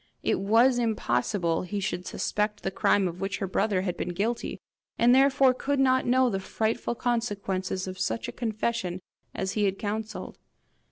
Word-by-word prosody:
It -, -, +1 dB
was 230 Hz, +6 st, +4 dB
impossible 170 Hz, -, 0 dB
he 200 Hz, +3 st, -3 dB
should 185 Hz, -1 st, -3 dB
suspect 210 Hz, 0 st, -2 dB
the -, -, -1 dB
crime 195 Hz, 0 st, +2 dB
of 175 Hz, +1 st, -6 dB
which 195 Hz, 0 st, -2 dB
her 195 Hz, -, -2 dB
brother 195 Hz, 0 st, +1 dB
had 180 Hz, -2 st, -2 dB
been -, -, -3 dB
guilty, 225 Hz, +5 st, -2 dB, 0.4 s
and 240 Hz, +1 st, +5 dB
therefore 270 Hz, 0 st, +5 dB
could 280 Hz, +2 st, -1 dB
not 260 Hz, -1 st, +3 dB
know 255 Hz, +1 st, +4 dB
the 195 Hz, -5 st, -1 dB
frightful 225 Hz, +4 st, -2 dB
consequences 200 Hz, -6 st, -2 dB
of 185 Hz, 0 st, -7 dB
such 115 Hz, -6 st, -1 dB
a -, -, -4 dB
confession 215 Hz, -5 st, -2 dB, 0.3 s
as 190 Hz, 0 st, -2 dB
he 210 Hz, 0 st, +1 dB
had 195 Hz, 0 st, 0 dB
counselled. 215 Hz, +1 st, -5 dB
210 Hz, 170 wpm, -27 LUFS, 190-235 Hz, 0.4 s, and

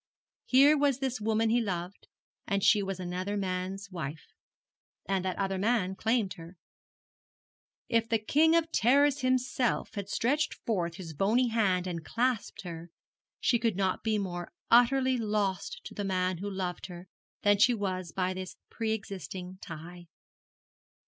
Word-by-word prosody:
Here 275 Hz, +4 st, +6 dB
was 285 Hz, -3 st, +2 dB
this 265 Hz, -4 st, -2 dB
woman 220 Hz, +1 st, +1 dB
he 240 Hz, +1 st, +3 dB
loved, 180 Hz, -3 st, -4 dB, 0.4 s
and 200 Hz, -1 st, 0 dB
she 205 Hz, +1 st, +5 dB
was 195 Hz, -1 st, -4 dB
another 185 Hz, +3 st, -3 dB
man's 190 Hz, +1 st, -3 dB
wife, 155 Hz, -3 st, -6 dB, 0.7 s
and 195 Hz, -2 st, 0 dB
that 185 Hz, -1 st, -2 dB
other 195 Hz, -1 st, -1 dB
man 205 Hz, -3 st, +1 dB
claimed 220 Hz, 0 st, 0 dB
her. 170 Hz, +2 st, -11 dB, 1.3 s
If 230 Hz, 0 st, +1 dB
the 225 Hz, -, +3 dB
King 305 Hz, +9 st, +3 dB
of 330 Hz, -1 st, +2 dB
Terrors 280 Hz, +4 st, +4 dB
himself 255 Hz, -1 st, 0 dB
had 200 Hz, -1 st, -5 dB
stretched 285 Hz, +9 st, +1 dB
forth 175 Hz, -7 st, -1 dB
his 165 Hz, -3 st, -8 dB
bony 225 Hz, -, +2 dB
hand 195 Hz, -6 st, +1 dB
and 170 Hz, -3 st, -4 dB
clasped 240 Hz, -1 st, -1 dB
her, 170 Hz, -1 st, -7 dB, 0.5 s
she 235 Hz, -, +2 dB
could 230 Hz, -4 st, +1 dB
not 190 Hz, -1 st, 0 dB
be 220 Hz, -1 st, +1 dB
more 175 Hz, -3 st, -4 dB, 0.2 s
utterly 260 Hz, +2 st, +5 dB
lost 205 Hz, -4 st, -1 dB
to -, -, -9 dB
the 205 Hz, -, -4 dB
man 185 Hz, -2 st, 0 dB
who 200 Hz, +2 st, -3 dB
loved 185 Hz, -3 st, -4 dB
her 175 Hz, 0 st, -10 dB, 0.4 s
than 205 Hz, -1 st, +4 dB
she 245 Hz, +3 st, +5 dB
was 185 Hz, -4 st, -3 dB
by 185 Hz, +1 st, -1 dB
this 185 Hz, 0 st, -6 dB, 0.2 s
pre 225 Hz, -1 st, -1 dB
existing 185 Hz, -3 st, -6 dB
tie. 170 Hz, +2 st, -9 dB
200 Hz, 155 wpm, -30 LUFS, 185-235 Hz, 1.3 s, Here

